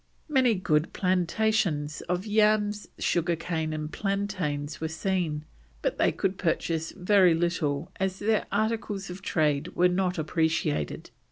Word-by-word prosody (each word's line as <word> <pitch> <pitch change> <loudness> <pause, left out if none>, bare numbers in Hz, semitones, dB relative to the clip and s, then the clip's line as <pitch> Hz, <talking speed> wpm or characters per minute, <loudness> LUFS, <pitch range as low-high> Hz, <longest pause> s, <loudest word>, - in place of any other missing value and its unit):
Many 260 -6 +3
good 155 -4 +1
plantations 180 -4 +1
of 180 +2 -1
yams, 210 -1 +2
sugar 170 0 +1
cane, 160 -1 -2
and 155 0 -4
plantains 185 -8 -2
were 160 - 0
seen, 160 -2 -2 0.4
but - - -1
they - - +4
could 190 0 -2
purchase 165 -2 -1
very 185 -2 +4
little 165 -3 -1
as 190 0 -1
their 215 +2 +1
articles 210 -2 -1
of 185 +2 -8
trade 155 -3 0
were 180 +1 +4
not 180 0 0
appreciated. 155 - -1
180 Hz, 135 wpm, -27 LUFS, 155-200 Hz, 0.4 s, they